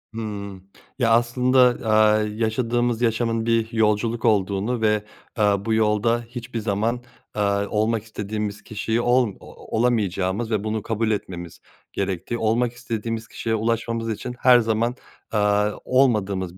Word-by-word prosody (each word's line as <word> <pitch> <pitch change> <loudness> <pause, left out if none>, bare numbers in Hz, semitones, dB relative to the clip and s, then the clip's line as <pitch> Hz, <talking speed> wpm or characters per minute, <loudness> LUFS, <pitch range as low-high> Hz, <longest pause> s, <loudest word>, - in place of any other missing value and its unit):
Hıı. 100 -4 -6 0.4
Ya 115 -2 +3
aslında, 125 +2 +3 0.3
aaa, 110 0 +5
yaşadığımız 115 +2 -1
yaşamın 115 -1 0
bir 115 0 +1
yolculuk 110 +1 +1
olduğunu 105 +2 +1
ve, 105 -1 +2 0.4
ııı, 100 -2 +2
bu 115 - +1
yolda 110 +2 +2
hiçbir 120 0 -6
zaman, 110 +3 -1 0.3
eee, 105 - -1 0.3
olmak 110 0 0
istediğimiz 105 -1 -4
kişiyi 110 +2 -2
ol 120 -4 +2
olamayacağımız 110 -2 -1
ve 105 -2 0
bunu 110 0 -2
kabul 115 0 -1
etmemiz 85 -4 -5 0.3
gerektiği, 95 +4 -2
olmak 115 +2 +1
istediğimiz 115 -2 -4
kişiye 110 -1 -2
ulaşmamız 115 +1 -1
için 120 +3 -4
her 125 -1 +6
zaman 115 +2 0 0.4
eee 105 0 +2
olmadığımız 100 -8 +1
110 Hz, 125 wpm, -23 LUFS, 105-115 Hz, 0.4 s, her